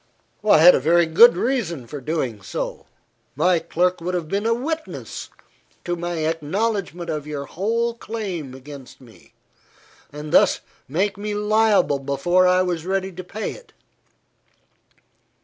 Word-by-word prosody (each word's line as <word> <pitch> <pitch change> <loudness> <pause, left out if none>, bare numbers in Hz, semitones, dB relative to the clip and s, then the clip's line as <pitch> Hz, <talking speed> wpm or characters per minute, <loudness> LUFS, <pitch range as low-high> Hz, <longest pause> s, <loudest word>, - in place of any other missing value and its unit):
"I 215 - +6
had 175 +3 +9
a - - +2
very 170 +5 +3
good 215 +10 +6
reason 195 - -1
for 145 +3 -8
doing 130 -7 -3
so. - - -5 0.5
My 180 -2 +3
clerk 180 +2 0
would 180 +2 -2
have 170 -3 -3
been 200 +6 -1
a 230 - +3
witness 315 +6 -5 0.6
to 175 -1 -1
my 170 -2 -3
acknowledgment 175 +2 -2
of 150 -1 -4
your 145 -2 -5
whole 230 +8 -1
claim 195 - -6
against 135 0 -12
me, 120 -4 -19 0.8
and 150 +1 -8
thus - - +4 0.3
make 195 +7 -1
me 210 0 -3
liable 210 -7 +2
before 160 +7 +2
I 185 0 +4
was 175 -3 -2
ready 190 +1 -2
to 185 +1 -8
pay 210 +4 -5
it. - - -14
175 Hz, 145 wpm, -22 LUFS, 155-210 Hz, 0.8 s, had